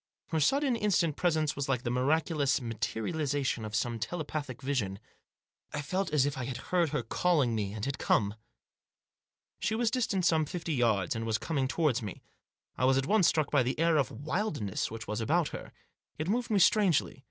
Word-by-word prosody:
Her 160 - 0
sudden, 270 - +2
instant 185 -8 +1
presence 155 -4 +1
was 140 -1 -3
like 125 -2 0
the 120 - -1
miraculous 145 +2 +1
materialisation 125 - -2
of 105 -1 -5
some 115 +1 -1
telepathic 145 0 -4
vision. 130 -9 -2 0.8
I 145 - -2
felt 185 +5 -2
as 145 -3 +3
if 145 -2 -2
I 125 - -3
had 125 -1 -4
heard 170 +4 0
her 150 +1 -2
calling 150 -10 +1
me, 105 -3 -2
and 110 -1 -4
had 140 - -3
come. 100 -1 +2 1.3
She 220 - 0
was 230 -1 +1
distant 220 -7 0
some 160 -2 +3
fifty 165 +1 -4
yards, 115 -7 +1
and 115 - -3
was 110 -1 0
coming 135 +3 -1
towards 145 -4 +1
me. 105 -3 -7 0.6
I 125 - +3
was 130 +1 +4
at 135 - +1
once 205 +1 +4
struck 155 -3 +1
by 145 - +4
the 125 +2 -1
air 165 -1 +3
of 135 -6 +2
wild 155 - -2
ness 100 -3 -2
which 110 0 -7
was 105 +2 -3
about 160 +7 +1
her. - - -8 0.5
It 155 - -3
moved 235 +5 0
me 210 - +2
strangely. 190 -7 +3
145 Hz, 195 wpm, -30 LUFS, 120-170 Hz, 1.3 s, was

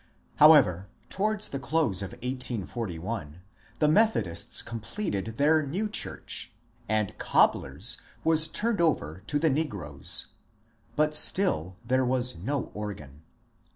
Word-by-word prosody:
However, 135 - +5 0.2
towards 215 +1 0
the 140 - -5
close 135 - +1
of 100 -1 -6
1841 110 - -5 0.4
the 150 - +2
Methodists 120 - +2
com 115 0 -6
pleted 110 - -4
their 155 +2 +3
new 180 +10 -3
church, 210 - -5 0.4
and 110 -2 +1
^^ - - -19
Cobler's 65 +1 +1
" - - -29
was 160 0 +4
turned 225 -4 -1
over 95 - -1
to 145 - 0
the 155 +1 +2
negroes. 100 - +2 0.7
But 150 0 +1
still 95 - +3
there 130 +2 +1
was 125 0 0
no 130 +11 -4
organ. 80 -9 -8
125 Hz, 125 wpm, -27 LUFS, 95-155 Hz, 0.7 s, However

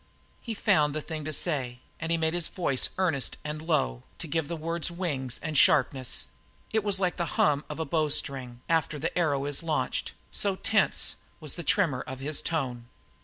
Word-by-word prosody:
He 230 -2 -4
found 155 -9 +3
the 155 - -1
thing 155 0 -5
to 155 - -2
say, 135 -6 0 0.2
and 165 +1 -3
he 170 - +3
made 160 0 +1
his 175 -2 +3
voice 140 -8 +1
earnest 170 -8 +1
and 150 +1 -4
low 150 - 0 0.2
to - - -6
give 160 0 -1
the 170 - -3
words 165 +2 -1
wing 170 -7 -3
and 155 -1 -3
sharpness; 130 -2 +3 0.5
it 220 -1 +2
was 200 -2 +3
like 180 -2 +1
the 170 - 0
hum 145 -1 +3
of 150 - -5
the 160 - -2
bow 155 +1 +1
string 130 -4 -1
after 160 -2 +1
the 160 +3 -3
arrow 145 -6 +1
is 145 -1 0
launched, 160 -2 -1 0.2
so 200 -2 +1
tense 215 0 +2 0.2
was 155 -4 -3
the 175 - -4
tremor 170 -8 +2
of 130 - -5
his 145 +2 0
tone. 125 -8 -2
155 Hz, 195 wpm, -28 LUFS, 140-170 Hz, 0.5 s, found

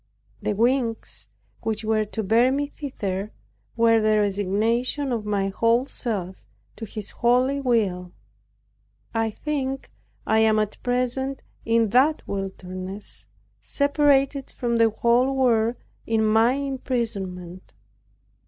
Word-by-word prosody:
The - - -1
wings, 235 +1 -1 0.3
which 220 0 -2
were 215 -1 +1
to 220 +1 -4
bear 230 +6 +4
me 285 +2 0
thither, 210 -9 -5 0.5
were 230 -1 +4
the 215 0 +3
resignation 215 +7 0
of 220 -3 -2
my 200 -2 0
whole 230 +5 +2
self 195 -9 -4 0.3
to 225 - -6
His 210 -1 -8
holy 250 +3 +2
will. 200 -9 0 1.0
I 225 -1 +1
think 270 +2 -4 0.3
I 220 - +3
am 220 -1 +4
at 215 -1 -2
present 255 +2 -1 0.2
in 230 -1 +2
that 275 +8 +3
wilderness, 190 0 -6 0.3
separated 280 -1 +2
from 235 -1 -1
the 230 0 +5
whole 240 +4 +2
world 235 -3 +2 0.3
in 225 -1 +2
my 225 +3 +4
imprisonment. 225 -10 -4
230 Hz, 115 wpm, -24 LUFS, 210-255 Hz, 1.0 s, the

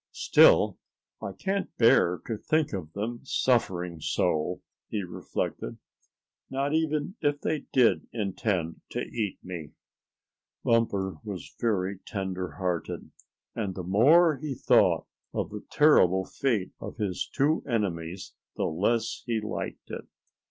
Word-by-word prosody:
"Still, - - +5 0.4
I - - -4
can't 195 +1 -3
bear 90 -6 +5
to 115 - -2
think 155 +6 0
of 85 -6 -4
them 115 +4 -3
suffering 95 -11 +1
so," 80 +4 0 0.3
he 105 -2 -2
reflected, 90 - -4 0.7
"not 140 +2 -1
even 160 +4 0
if 145 0 +1
they 155 -2 -2
did 125 -3 +3
intend 95 -5 -2
to - - -1
eat 105 -4 -3
me." 85 -6 -7 0.9
Bumper 100 -6 +1
was 95 -7 -7
very 100 -4 0
tender 95 -2 -4
hearted, 90 -4 -3 0.4
and 100 -5 -3
the 90 - -4
more 145 - +5
he 150 -2 -4
thought - - +4 0.3
of - - -2
the 105 0 -7
terrible 95 - +5
fate 110 -7 -1
of - - -7
his 100 -5 -2
two 150 +4 +2
enemies 90 -6 -2 0.2
the - - -1
less 110 +8 0
he 115 -2 +1
liked 105 0 -5
it. - - -6
105 Hz, 130 wpm, -28 LUFS, 90-135 Hz, 0.9 s, Still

